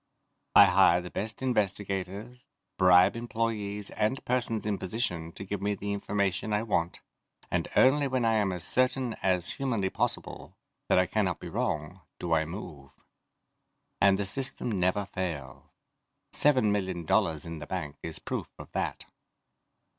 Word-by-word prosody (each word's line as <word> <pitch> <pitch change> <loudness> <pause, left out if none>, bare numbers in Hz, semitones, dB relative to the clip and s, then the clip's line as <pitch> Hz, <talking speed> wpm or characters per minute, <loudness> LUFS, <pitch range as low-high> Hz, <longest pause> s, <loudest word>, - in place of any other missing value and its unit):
I - - +10
hire 85 - +5
the 90 0 -8
best 110 +5 -3
investigators, 100 0 -2 0.4
bribe 90 +2 +6
employees 110 -3 -2
and 120 +6 -1
persons 120 -4 -1
in 105 -2 -1
position 90 -5 -2
to - - -8
give 100 0 -4
me 100 0 0
the 100 0 -3
information 100 0 -1
I 105 +1 +1
want, 85 -6 -1 0.5
and - - 0
only 140 +2 +5
when 130 -3 0
I 115 - +3
am 105 -3 +2
as 90 -2 -4
certain 130 -1 +1
as 90 -2 +1
humanly 115 -9 -1
possible - - -3 0.3
that - - +4
I 90 - +5
cannot 95 -1 0
be - - -7
wrong 75 +5 -2 0.2
do 85 -2 -2
I 80 -1 +3
move. 80 -5 -8 1.1
And 95 0 +5
the 100 - -1
system 130 +3 -2
never 90 +3 +1
fails. 85 -10 -5 0.7
Seven 130 -8 +4
million 95 -4 -2
dollars 80 -5 +1
in 85 -1 -6
the 75 - -8
bank 80 -7 -4
is 80 -1 -4
proof - - -4
of - - -11
that. - - -3
100 Hz, 155 wpm, -29 LUFS, 90-110 Hz, 1.1 s, I